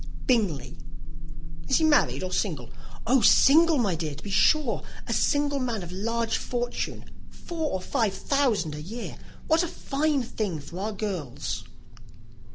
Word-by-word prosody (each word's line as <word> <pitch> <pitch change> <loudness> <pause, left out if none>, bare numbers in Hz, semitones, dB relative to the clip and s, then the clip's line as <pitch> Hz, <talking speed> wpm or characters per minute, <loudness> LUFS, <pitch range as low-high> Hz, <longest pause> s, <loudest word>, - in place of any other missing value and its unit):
"Bingley." 210 - 0 0.9
"Is - - +3
he 320 - +1
married 300 -10 +3
or 185 - -4
single?" 155 - -2 0.3
"Oh, 250 +2 +4
single, 315 +8 +6
my 210 -7 +1
dear, 155 -3 -3
to 150 - -12
be 200 - -6
sure! 280 +5 +3 0.2
A - - -2
single 285 -1 +1
man 235 -6 -2
of 175 - -8
large 230 +4 -1
fortune; 245 -1 -3 0.2
four 325 -3 -4
or 190 - -2
five 200 +1 0
thousand 225 - +1
a 150 - -6
year. 225 +9 -6 0.3
What 320 +1 +3
a 350 - 0
fine 295 -3 -1
thing 205 -8 -3
for 155 +5 -9
our 210 +3 -2
girls!" 195 - -4
225 Hz, 155 wpm, -26 LUFS, 185-280 Hz, 0.9 s, single